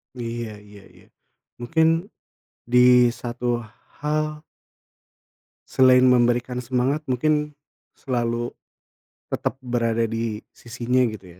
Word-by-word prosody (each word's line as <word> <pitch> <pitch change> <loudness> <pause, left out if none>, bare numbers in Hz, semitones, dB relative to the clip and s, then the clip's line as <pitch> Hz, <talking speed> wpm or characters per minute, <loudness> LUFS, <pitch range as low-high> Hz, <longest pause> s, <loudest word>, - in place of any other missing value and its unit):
Iya 115 -2 -5 0.2
iya 100 -1 -14
iya. - - -20 0.5
Mungkin 160 +7 +2 0.8
di 125 - +4 0.4
satu 120 0 -2 0.4
hal 150 0 -2 1.3
selain 130 0 +5
memberikan 125 0 +2
semangat, 130 +5 0
mungkin 150 +4 +1 0.4
selalu 120 -2 -3 0.8
tetap - - -2
berada 115 -2 0
di 115 -1 -3
sisinya 120 +2 -2
gitu 95 -5 -10
120 Hz, 90 wpm, -23 LUFS, 115-130 Hz, 1.3 s, selain